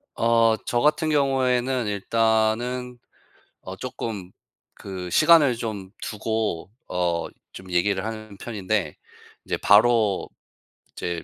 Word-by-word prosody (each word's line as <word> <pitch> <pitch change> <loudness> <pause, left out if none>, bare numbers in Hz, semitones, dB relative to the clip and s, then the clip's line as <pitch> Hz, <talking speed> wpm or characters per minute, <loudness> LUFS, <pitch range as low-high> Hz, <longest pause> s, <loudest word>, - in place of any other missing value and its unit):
어 115 -1 +3
저 120 - 0
같은 155 +2 +2
경우에는 130 -4 +1
일단은 115 +4 0 0.6
어 - - -8
쪼끔 100 -5 -6 0.4
그 95 -2 -7
시간을 155 - +5
좀 105 -5 -5
두고 110 -4 -3 0.2
어 85 -2 -1 0.3
좀 95 -1 -11
얘기를 95 +3 +1
하는 110 -2 -7
편인데 100 -6 -2 0.5
이제 - - -2
바로 105 -1 +3 0.6
이제 85 -2 -4
110 Hz, 200 characters per minute, -24 LUFS, 95-120 Hz, 0.6 s, 시간을